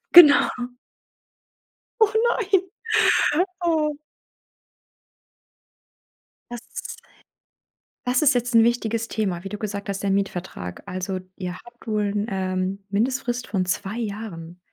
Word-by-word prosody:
Genau. 300 -5 +10 1.5
Oh 435 -1 +4
nein. 395 -6 +2 1.0
Oh. 310 -3 +1 2.5
Das 240 -1 -7 1.1
das 250 0 +3
ist 290 -2 +5
jetzt 245 0 -1
'n 230 - +7
wichtiges 230 -1 0
Thema, 190 -6 -2
wie - - -4
du 210 - -5
gesagt 200 -1 -4
hast, 200 0 -3
der 195 - +1
Mietvertrag. 180 - -3
Also, 185 +1 -3 0.2
ihr 180 -2 -4
habt 240 +2 -17
wohl 210 -1 +1
'n, 205 +1 -1
ähm, 185 0 -2
Mindestfrist 240 +3 -1
von 185 -3 0
2 190 +3 -2
Jahren. 200 -6 -6
210 Hz, 110 wpm, -24 LUFS, 190-245 Hz, 2.5 s, Genau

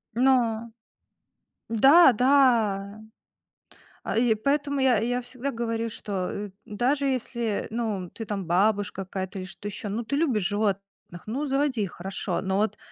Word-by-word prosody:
Но 235 -3 +2 1.0
Да, 270 +7 +7
да. 225 -6 +2 1.0
А, - - -2
и 235 -1 +4
поэтому 285 +5 0
я, 260 -3 +4
я 245 +3 -1
всегда 255 +3 -5
говорю, 230 -1 -2
что, 195 -4 -4
э, 205 0 -5 0.2
даже 255 +7 0
если, 235 -4 -2
ну, 215 -6 -3
ты 225 - -7
там 205 -3 -4
бабушка 195 +2 +1
какая-то 190 +1 -5
или 185 - -5
что 195 +2 -8
ещё, 205 +1 -5
ну, 220 +4 -2
ты 280 - -2
любишь 270 - +1
животных, 205 -1 0 0.4
ну, 260 +8 -3
заводи 270 -3 0
их, 195 -4 -2
хорошо. 190 +2 -3
Но 190 0 -1
вот 215 +2 0
225 Hz, 150 wpm, -26 LUFS, 200-255 Hz, 1.0 s, Да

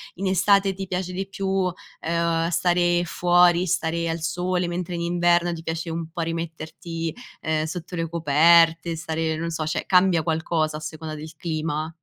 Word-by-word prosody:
in 190 +2 -3
estate 195 +1 +3
ti 195 +1 -5
piace 180 0 -3
di 190 +1 -3
più, 190 -1 -1 0.3
ehm, 170 0 0
stare 175 0 +2
fuori, 175 +1 +4
stare 165 0 0
al 165 - -2
sole 180 +3 -1
mentre 175 0 -3
in 170 - -3
inverno 175 0 +2
ti 165 - -8
piace 165 +1 -3
un 165 0 -4
po' 170 0 -4
rimetterti, 165 0 -4 0.3
ehm, 155 -1 0
sotto 170 +2 -6
le 165 -1 -2
coperte, 165 +1 +4
stare, 160 -1 -2
non 170 +1 -3
so 160 -2 -3
cioè 155 - -2
cambia 180 -3 +4
qualcosa 160 -1 0
a - - -7
seconda 155 0 -6
del 155 +1 -9
clima? 155 -2 -2
170 Hz, 170 wpm, -24 LUFS, 160-175 Hz, 0.3 s, fuori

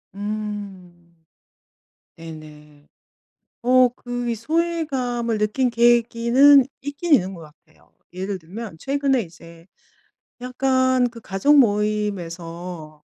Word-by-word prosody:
음. 200 -5 -7 1.0
네네. 150 -2 -13 0.8
어 255 0 +5
그 245 0 -5
이 230 - -1
소외감을 260 -5 -2
느낀 210 +5 0
계기는 240 +3 +4 0.2
있기는 290 +4 -2
있는 190 -4 -1
것 170 - -11 0.2
같아요. 155 - -28 0.2
예를 190 +1 -4
들면 190 +2 -9
최근에 275 -2 0
이제 165 -1 -14 0.8
약간 260 0 +1
그 230 -1 -12
가족 215 +10 +2
모임에서 180 - -2
215 Hz, 190 characters per minute, -22 LUFS, 175-255 Hz, 1.0 s, 어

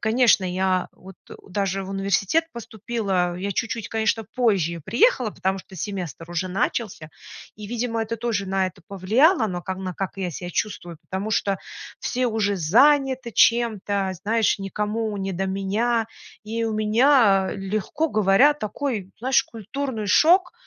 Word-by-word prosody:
конечно, 225 -3 +3
я 185 0 0
вот 190 0 -14 0.3
даже 195 0 -1
в 190 - -7
университет 200 - +1
поступила. 200 -6 -2
Я 195 +2 -3
чуть-чуть, 220 +1 -3
конечно, 225 0 0
позже 185 -9 +1
приехала, 245 - +2
потому 190 0 -2
что 190 - -13
семестр 175 -2 -6
уже 175 +2 -2
начался, 190 -4 -2 0.5
и, 210 0 -8
видимо, 230 0 -2
это 225 +1 -3
тоже 220 -4 -2
на 190 0 +1
это 185 - -17
повлияло, 220 - +3
но 180 -2 -4
ка 190 +2 -4
на 185 -1 -5
как 190 +2 -4
я 185 -2 -2
ся 175 +3 -6
чувствую, 175 -5 -4
потому 200 +3 -4
что 195 -1 0 0.4
все 250 0 -1
уже 210 -2 0
заняты 260 - +3
чем-то, 205 -5 +2
знаешь, 220 -1 +1
никому 210 +2 -2
не 195 -1 -3
до 190 +2 -2
меня. 215 +4 0 0.4
И 225 +2 -3
у 220 - -1
меня, 215 -2 +4
легко 215 +11 -2
говоря, 215 +5 +4
такой, 220 -5 -4
знаешь, 260 +3 +3
культурный 230 0 -5
шок. 345 - +4
210 Hz, 150 wpm, -23 LUFS, 190-230 Hz, 0.5 s, меня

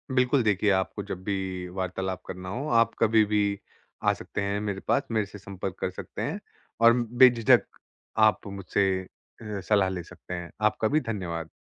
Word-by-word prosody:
बिल्कुल 125 0 +3
देखिए 105 -1 +2
आपको 95 +2 0
जब 95 -2 -6
भी 95 -2 -3
वार्तालाप 95 0 -3
करना 90 0 -6
हो, 130 +9 -3
आप 115 -1 +3
कभी 110 -1 +5
भी 105 -1 +1 0.4
आ - - +4
सकते - - -5
हैं 100 +1 -1
मेरे 100 -2 -3
पास, 140 - +3
मेरे 110 -2 +1
से 100 +1 -11
संपर्क 95 -1 -6
कर - - -1
सकते 95 - -7
हैं। - - -2 0.4
और 115 0 +8
बेझिझक 120 -1 +5 0.6
आप 105 - -1
मुझसे 100 0 0 0.5
अ, 105 -2 -5
सलाह 100 0 +2
ले 90 -2 -4
सकते 90 - -10
हैं। 85 -1 -5 0.2
आपका 110 0 +2
भी 155 +5 +2
धन्यवाद। 85 -5 -4
100 Hz, 175 wpm, -27 LUFS, 95-110 Hz, 0.6 s, और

